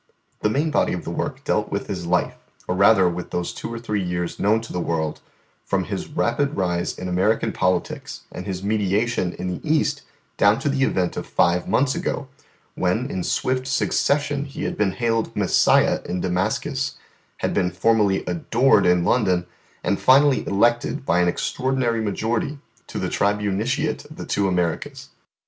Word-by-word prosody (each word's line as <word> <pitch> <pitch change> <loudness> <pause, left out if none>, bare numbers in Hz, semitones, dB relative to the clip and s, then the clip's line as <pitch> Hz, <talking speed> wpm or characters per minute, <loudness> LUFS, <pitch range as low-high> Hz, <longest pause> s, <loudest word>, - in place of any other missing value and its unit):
The 105 - +1
main 150 +7 0
body - - +2
of 90 - -4
the 85 - -5
work 135 - -4
dealt 105 -5 0
with 100 - -2
his 90 -4 -5
life, 90 -1 +1 0.3
or - - 0
rather 95 0 +5
with 90 0 -3
those 90 0 -3
two - - -6
or 115 - -4
three 105 -3 -2
years 90 -1 -3
known 105 +2 +3
to 115 - -9
the 90 - -1
world, 80 -3 -2 0.4
from - - 0
his - - -4
rapid 145 0 0
rise 90 -2 -1
in 90 - -5
American 95 +5 +1
politics 90 -1 -1
and - - -7
his 95 -1 -4
mediation 105 -1 0
in 90 - -5
the - - -5
East 155 0 +1 0.4
down 100 +2 +5
to 145 - -1
the 135 -1 0
event 90 -7 -1
of - - -4
five 85 +1 +2
months 135 0 +2
ago, 140 - -3 0.5
when 110 +9 0
in 95 - -2
swift 130 +6 -1
succession 140 +1 +1
he 140 - -7
had - - -2
been 100 -3 +1
hailed 115 -1 -1
Messiah - - +3
in 90 - -3
Damascus, 110 +10 -1 0.4
had - - -1
been 90 -2 +1
formally 100 +1 +2
adored 135 - +3
in 90 -1 +4
London, 95 -7 +2 0.4
and 100 +2 0
finally 140 +1 +5
elected 120 +7 +1
by 90 - +2
an 90 - +3
extraordinary 125 +4 0
majority 110 +6 -1 0.3
to - - -6
the - - -1
Tribuniciate 105 +8 0
of 155 - -11
the - - -7
two 100 -1 0
Americas. 90 -3 -2
105 Hz, 175 wpm, -23 LUFS, 90-130 Hz, 0.5 s, rather